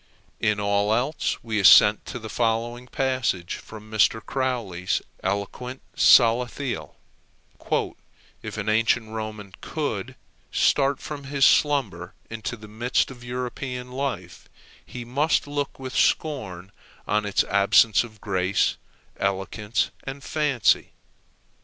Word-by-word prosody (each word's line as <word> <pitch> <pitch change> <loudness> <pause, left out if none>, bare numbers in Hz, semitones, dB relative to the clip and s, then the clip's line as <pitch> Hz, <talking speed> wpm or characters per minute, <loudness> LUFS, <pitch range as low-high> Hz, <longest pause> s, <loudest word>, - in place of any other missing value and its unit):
In 105 -2 +1
all 100 +1 +2
else 135 +6 -1
we 110 -2 -1
assent 105 +1 +7
to - - -5
the 110 -2 -7
following 120 +3 -1
passage 130 -10 -1
from 110 -1 -12
Mr. 110 +1 +3
Croly's 115 -9 -2 0.2
eloquent 100 +7 -4
Salathiel: 125 +2 +3 1.5
"If - - -7
an - - -4
ancient 110 +1 +2
Roman 110 -3 -6
could - - -4 0.4
start 140 -1 +2
from 145 -2 -7
his 140 0 +2
slumber 120 - +2 0.2
into 115 +2 -5
the 105 0 -12
midst 120 +5 0
of 120 -2 -12
European 125 +1 -5
life, 125 -11 -5 0.3
he 125 -1 -8
must 140 +6 +1
look 145 -1 -3
with 130 -1 -7
scorn 95 - 0 0.4
on 105 +1 +1
its 105 -2 +1
absence 100 +2 +4
of 110 -3 -12
grace, 95 -1 0 0.4
elegance, 100 +3 -1
and 135 +1 -7
fancy. 145 -7 +1
115 Hz, 115 wpm, -24 LUFS, 105-130 Hz, 1.5 s, assent